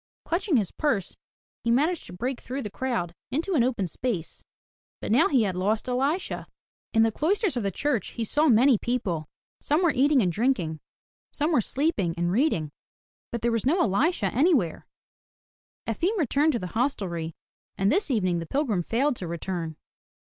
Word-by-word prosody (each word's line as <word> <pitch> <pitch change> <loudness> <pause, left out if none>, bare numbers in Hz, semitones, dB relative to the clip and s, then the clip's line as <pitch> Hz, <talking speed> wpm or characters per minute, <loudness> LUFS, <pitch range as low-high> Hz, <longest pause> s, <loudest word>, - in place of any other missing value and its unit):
Clutching 340 -2 +1
his 205 -5 0
purse, 225 - -1 0.5
he 235 - 0
managed 300 +8 +1
to 180 - -10
break 245 +7 -3
through 265 +2 -4
the 210 - -5
crowd 215 -8 -2 0.2
into 320 +9 -1
an 270 -8 +4
open 235 -6 0
space, 180 0 -4 0.6
but - - -4
now 265 +9 +5
he 260 -6 +3
had 190 -3 -1
lost 210 +6 0
Elisha. 275 +8 -1 0.4
In 225 -1 +4
the 225 - +3
cloisters 375 - 0
of 240 - 0
the 200 - 0
church 255 +4 -1
he 235 - -3
saw 295 +8 +2
many 245 -1 +5
people. 185 -11 -2 0.3
Some 305 +5 +1
were 340 - +4
eating 275 -1 +4
and 180 - +1
drinking; 185 - 0 0.5
some 300 +3 0
were 295 - +4
sleeping 220 - 0
and 175 0 0
reading. 185 - +1 0.6
But 235 -1 -4
there 235 - +2
was 230 -2 0
no 335 +7 +3
Elisha 230 - +1
anywhere. 260 - +2 1.0
Efim 390 +6 0
returned 300 - +2
to 235 - 0
the 180 -3 -6
hostelry 185 - -1 0.4
and 195 +1 +2
this 390 +3 +1
evening 185 -9 +1
the 165 - -6
pilgrim 250 - 0
failed 255 - +1
to 180 - -5
return. 170 -1 -4
240 Hz, 175 wpm, -26 LUFS, 190-290 Hz, 1.0 s, now